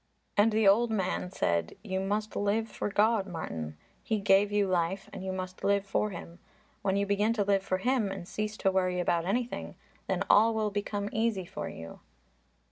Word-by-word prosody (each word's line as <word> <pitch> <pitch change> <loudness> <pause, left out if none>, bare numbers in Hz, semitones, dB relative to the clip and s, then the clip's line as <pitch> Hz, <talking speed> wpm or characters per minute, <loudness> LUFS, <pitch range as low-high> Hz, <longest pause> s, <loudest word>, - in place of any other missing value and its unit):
And 210 +2 +5
the 215 -1 +3
old 230 +4 +5
man 190 -4 -1
said, 85 - -1
"You 190 0 -2
must 210 +2 -2
live 210 +2 +1
for 210 - -4
God, 210 0 +2
Martin. 80 - -5 0.2
He 220 - -1
gave 200 0 +4
you 205 -1 +2
life 185 +1 0
and - - -6
you 190 - -2
must 185 0 -6
live 200 0 +2
for 210 +2 0
Him. 175 -2 -9 0.4
When 195 0 +1
you 200 - +1
begin 205 +3 +2
to 215 -3 +1
live 200 -1 +2
for 190 -1 -1
Him 235 -1 +1
and 190 -3 -6
cease 215 +1 -3
to 195 - +2
worry 185 -1 +1
about 170 -1 +1
anything, 235 +6 -2 0.3
then - - 0
all 225 +2 +5
will 215 -1 0
become 205 0 -2
easy 220 -4 0
for - - -5
you." 80 0 -9
200 Hz, 195 wpm, -30 LUFS, 185-215 Hz, 0.4 s, And